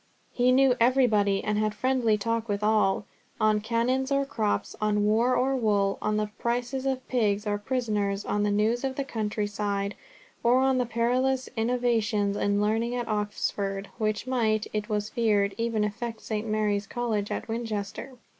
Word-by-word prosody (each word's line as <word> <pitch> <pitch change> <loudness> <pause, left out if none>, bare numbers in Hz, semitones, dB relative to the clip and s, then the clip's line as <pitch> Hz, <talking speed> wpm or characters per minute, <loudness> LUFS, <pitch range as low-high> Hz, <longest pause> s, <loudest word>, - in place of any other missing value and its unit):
He 250 0 +3
knew 265 0 +5
everybody, 225 -5 +3
and 210 0 0
had 215 0 0
friendly 245 -2 +2
talk 230 +1 -2
with 205 0 -1
all, 210 -2 +2 0.3
on 215 -1 +3
canons 250 +4 0
or 275 0 +2
crops, 225 -7 -2
on 210 -1 +2
war 230 +4 +3
or 270 +1 +1
wool, 205 -5 +1
on 215 0 0
the 210 0 -1
prices 245 +3 -1
of 260 -1 -2
pigs 210 -4 +1
or 205 -1 -1
prisoners, 210 -4 -1
on 205 - 0
the 205 - +2
news 215 +4 +1
of 265 -1 -2
the 275 - -1
country 215 -5 -2
side, 200 -1 -2 0.5
or 240 +2 +4
on 265 -1 +2
the 245 - 0
perilous 250 +3 0
innovations 225 -3 +1
in 205 0 +1
learning 225 +3 0
at 245 -1 -3
Oxford, 205 -2 -2
which 215 0 -1
might, 225 -4 +1
it 210 +1 -2
was 210 -1 -1
feared, 205 -4 +1
even 230 -2 0
affect 225 +2 -4
St. 215 0 -3
Mary's 210 -2 0
College 220 -4 -2
at - - -4
Winchester. 225 +1 -4
220 Hz, 170 wpm, -27 LUFS, 210-245 Hz, 0.5 s, knew